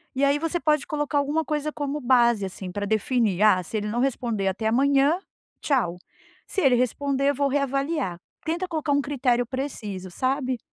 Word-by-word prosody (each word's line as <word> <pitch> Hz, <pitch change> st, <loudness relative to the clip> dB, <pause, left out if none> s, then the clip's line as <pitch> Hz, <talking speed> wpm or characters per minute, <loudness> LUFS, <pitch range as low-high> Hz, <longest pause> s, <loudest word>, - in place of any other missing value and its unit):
E 275 Hz, -, 0 dB
aí 280 Hz, +1 st, +3 dB
você 330 Hz, +2 st, -1 dB
pode 305 Hz, -1 st, +1 dB
colocar 295 Hz, -2 st, -1 dB
alguma 295 Hz, +3 st, +1 dB
coisa 300 Hz, +1 st, -2 dB
como 290 Hz, 0 st, -3 dB
base, 240 Hz, -5 st, +3 dB
assim, 185 Hz, 0 st, -7 dB
pra 205 Hz, +2 st, -3 dB
definir 215 Hz, -2 st, +1 dB
"Ah, 210 Hz, -4 st, +5 dB
se 215 Hz, -, -4 dB
ele 210 Hz, 0 st, -2 dB
não 235 Hz, -, -2 dB
responder 240 Hz, -6 st, 0 dB
até 210 Hz, +4 st, -1 dB
amanhã, 275 Hz, +6 st, +3 dB, 0.4 s
tchau. 235 Hz, -, 0 dB, 0.5 s
Se 390 Hz, -, -2 dB
ele 265 Hz, -6 st, +5 dB
responder 275 Hz, +3 st, +1 dB
eu -, -, -5 dB
vou 280 Hz, +1 st, +1 dB
reavaliar". 275 Hz, -, -1 dB, 0.3 s
Tenta 345 Hz, +3 st, -1 dB
colocar 310 Hz, -3 st, -2 dB
primeiro 285 Hz, 0 st, +2 dB
critério 250 Hz, -4 st, +1 dB
preciso, 220 Hz, -8 st, -5 dB
sabe. 260 Hz, +3 st, -1 dB
270 Hz, 180 wpm, -25 LUFS, 220-290 Hz, 0.5 s, Ah